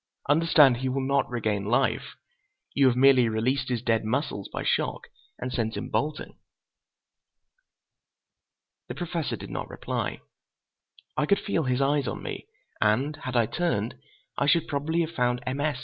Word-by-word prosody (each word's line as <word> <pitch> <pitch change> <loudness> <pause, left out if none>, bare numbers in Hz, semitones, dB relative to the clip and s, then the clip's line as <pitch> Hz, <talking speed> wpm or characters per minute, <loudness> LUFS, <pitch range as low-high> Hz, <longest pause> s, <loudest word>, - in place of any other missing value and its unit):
Understand, 150 -3 +5
he 130 +1 -2
will 130 +1 -1
not 140 -1 +1
regain 110 -4 -1
life. 120 +1 0 0.6
You 140 -1 +4
have 125 - +3
merely 130 -2 +5
released 130 +5 0
his 120 -2 -1
dead 115 -2 +2
muscles 110 -3 -2
by - - -4
shock, - - -1 0.3
and 125 0 -5
sent 110 -2 -1
him - - -5
bolting." 150 +1 -2 2.5
The - - -6
Professor 170 -3 -3
did - - -9
not - - -4
reply. - - -4 0.9
I 150 0 +1
could 200 - +4
feel 165 -7 -1
his 125 +1 +1
eyes 140 -1 +2
on - - -4
me, - - -6 0.3
and 125 +8 +2
had 130 -4 -6
I 120 -2 +4
turned, 125 -6 -1 0.5
I 140 - +1
should 165 +2 +3
probably 155 +4 0
had 165 -1 -2
found 125 -5 0
M. 130 +2 -2
S. 145 -2 0
130 Hz, 160 wpm, -27 LUFS, 120-150 Hz, 2.5 s, Understand